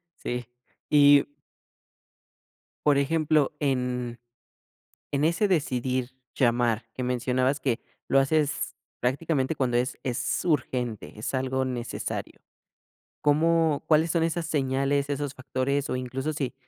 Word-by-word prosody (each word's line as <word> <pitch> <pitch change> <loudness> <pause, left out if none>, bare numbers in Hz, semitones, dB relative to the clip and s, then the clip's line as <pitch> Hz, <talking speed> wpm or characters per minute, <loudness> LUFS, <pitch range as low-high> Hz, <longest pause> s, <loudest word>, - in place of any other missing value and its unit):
Sí, 125 0 -4 0.4
y 145 -1 +7 1.6
por 145 -2 +5
ejemplo, 155 0 +2
en, 125 -3 -1 0.9
en 140 0 0
ese 170 +6 +2
decidir 130 -7 0 0.2
llamar, 120 -2 +2
que 130 - -4
mencionabas 125 +2 +1
que, 125 -3 0 0.3
lo 135 - +4
haces 150 +1 0 0.3
prácticamente 135 +3 0
cuando 125 -4 +1
es, 125 +2 -1
es 125 -2 -1
urgente, 125 - -1
es 105 - -4
algo 130 0 0
necesario, 125 -2 -4 0.8
¿cómo? 160 0 +3
¿Cuáles 160 +1 +4
son 165 -1 +2
esas 165 0 -1
señales, 140 -1 0
esos 145 -1 -2
factores? 135 +2 -1
O - - 0
incluso, 130 +4 -3
si, 135 -4 -3
135 Hz, 115 wpm, -27 LUFS, 125-150 Hz, 1.6 s, y